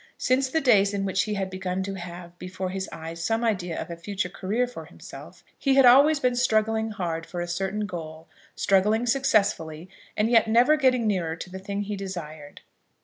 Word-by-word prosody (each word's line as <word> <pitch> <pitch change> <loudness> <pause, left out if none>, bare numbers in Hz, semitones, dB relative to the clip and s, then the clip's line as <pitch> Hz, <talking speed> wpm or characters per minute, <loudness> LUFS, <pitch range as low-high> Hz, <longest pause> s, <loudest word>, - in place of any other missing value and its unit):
Since 260 +1 +1
the 320 +4 0
days 205 -6 +4
in 195 0 -1
which 190 -1 +1
he 210 -1 -3
had 190 -1 -3
begun 185 0 -3
to 195 +1 -4
have 175 -1 -9
before 185 0 -5
his 190 0 -4
eyes 165 +1 -7
some 225 +5 0
idea 185 -7 -1
of - - -6
a - - -4
future 185 +2 -4
career 200 +6 -1
for 245 - -9
himself, - - -12 0.2
he 275 -1 +2
had 270 -1 +6
always 280 +5 +6
been 250 -2 +1
struggling 220 -2 +1
hard 170 -6 -3
for 175 - -6
a 175 - -3
certain 195 +4 -2
goal, 160 -4 -8 0.3
struggling 210 +4 +2
successfully, 205 - 0 0.3
and 215 +1 +2
yet 225 -2 +5
never 240 +7 +5
getting 255 -5 +2
nearer 180 -6 0
to 180 +2 -9
the 190 - -7
thing 200 +1 -4
he 205 +1 -4
desired. 160 -7 -8
195 Hz, 200 wpm, -25 LUFS, 180-225 Hz, 0.3 s, had